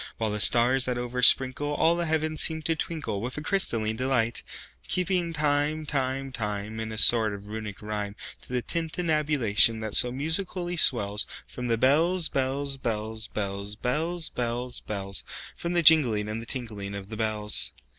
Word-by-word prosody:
While 110 Hz, -2 st, -1 dB
the 105 Hz, -, -3 dB
stars, 125 Hz, +4 st, +5 dB
that 125 Hz, -1 st, -1 dB
oversprinkleAll 130 Hz, +6 st, +2 dB
the 170 Hz, -1 st, -1 dB
heavens, 155 Hz, 0 st, 0 dB
seem 160 Hz, -1 st, +1 dB
to 165 Hz, 0 st, +1 dB
twinkleWith 130 Hz, -8 st, -4 dB
a -, -, -3 dB
crystalline 115 Hz, -, -1 dB
delight; 125 Hz, -3 st, 0 dB, 0.5 s
Keeping 180 Hz, -2 st, 0 dB
time, 150 Hz, 0 st, 0 dB
time, 135 Hz, -1 st, -2 dB
time, 105 Hz, -2 st, -4 dB
In 110 Hz, 0 st, -4 dB
a 110 Hz, -, -6 dB
sort 110 Hz, -2 st, +5 dB
of 100 Hz, +1 st, -11 dB
Runic 105 Hz, -2 st, -6 dB
rhyme, 105 Hz, -1 st, -4 dB, 0.3 s
To -, -, -18 dB
the 125 Hz, -1 st, -1 dB
tintinnabulation 150 Hz, -, +2 dB
that 110 Hz, -2 st, -4 dB
so 125 Hz, -, +4 dB
musically 175 Hz, +5 st, -2 dB
wellsFrom 120 Hz, -2 st, 0 dB
the 115 Hz, -1 st, +1 dB
bells, 160 Hz, +8 st, +2 dB
bells, 135 Hz, +1 st, -1 dB
bells, 110 Hz, -3 st, -3 dB
bells, 100 Hz, 0 st, -4 dB
Bells, 160 Hz, +9 st, -2 dB
bells, 120 Hz, +1 st, -3 dB
bells—From 100 Hz, -, -6 dB
the 170 Hz, -1 st, +2 dB
jingling 125 Hz, -10 st, +6 dB
and 110 Hz, +1 st, -4 dB
the 115 Hz, -, -10 dB
tinkling 105 Hz, -6 st, -5 dB
of 100 Hz, 0 st, -8 dB
the 110 Hz, -, -6 dB
bells. 105 Hz, -1 st, -1 dB
125 Hz, 155 wpm, -27 LUFS, 110-155 Hz, 0.5 s, jingling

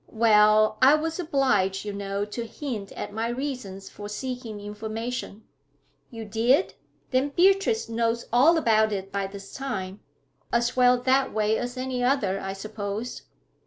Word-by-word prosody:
'Well, 215 Hz, -1 st, +4 dB
I 270 Hz, +3 st, +7 dB
was 325 Hz, +2 st, -2 dB
obliged, 270 Hz, -, +1 dB
you 205 Hz, -, -4 dB
know, 200 Hz, 0 st, -3 dB
to 230 Hz, +3 st, -6 dB
hint 225 Hz, -5 st, -6 dB
at 205 Hz, -, -6 dB
my 225 Hz, +2 st, -1 dB
reasons 240 Hz, -7 st, -5 dB
for 205 Hz, 0 st, -9 dB
seeking 245 Hz, -1 st, -5 dB
information.' 220 Hz, +2 st, -5 dB, 0.7 s
'You 225 Hz, -3 st, -8 dB
did? 235 Hz, -, +2 dB, 0.4 s
Then 260 Hz, +2 st, +2 dB
Beatrice 390 Hz, -, +3 dB
knows 230 Hz, +1 st, -1 dB
all 300 Hz, +8 st, +6 dB
about 220 Hz, -6 st, +3 dB
it 195 Hz, -1 st, -4 dB
by 200 Hz, -1 st, -2 dB
this 195 Hz, 0 st, -11 dB
time. 200 Hz, -8 st, -4 dB, 0.5 s
As 235 Hz, +1 st, +1 dB
well 250 Hz, -1 st, +5 dB
that 265 Hz, +2 st, +2 dB
way 215 Hz, 0 st, +1 dB
as 245 Hz, +2 st, -4 dB
any 255 Hz, -1 st, -2 dB
other, 225 Hz, -7 st, +1 dB
I 195 Hz, 0 st, -4 dB
suppose.' 210 Hz, +3 st, -5 dB
225 Hz, 150 wpm, -26 LUFS, 205-255 Hz, 0.7 s, I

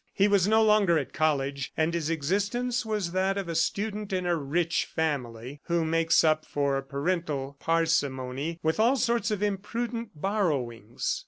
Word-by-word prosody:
He 200 Hz, -, +4 dB
was 200 Hz, -2 st, +3 dB
no 220 Hz, +1 st, +4 dB
longer 210 Hz, -6 st, +4 dB
at 140 Hz, -, -3 dB
college, 140 Hz, -3 st, 0 dB
and 160 Hz, +1 st, +1 dB
his 165 Hz, -2 st, -1 dB
existence 205 Hz, -, -1 dB
was 210 Hz, -6 st, -2 dB
that 190 Hz, +2 st, 0 dB
of 195 Hz, -3 st, -3 dB
a 170 Hz, -, -3 dB
student 205 Hz, +5 st, -1 dB
in 185 Hz, -1 st, -1 dB
a 175 Hz, -1 st, +2 dB
rich 165 Hz, +3 st, 0 dB
family 135 Hz, -3 st, -3 dB
who 170 Hz, -1 st, +1 dB
makes 165 Hz, +1 st, +3 dB
up 155 Hz, -1 st, +3 dB
for 140 Hz, -1 st, -1 dB
parental 140 Hz, -1 st, -2 dB
parsimony 155 Hz, -2 st, 0 dB
with 160 Hz, +5 st, 0 dB
all 235 Hz, +5 st, +4 dB
sorts 235 Hz, -3 st, +1 dB
of 210 Hz, -1 st, -1 dB
imprudent 215 Hz, 0 st, -3 dB
borrowings. 140 Hz, -, -1 dB
165 Hz, 160 wpm, -27 LUFS, 145-205 Hz, -, He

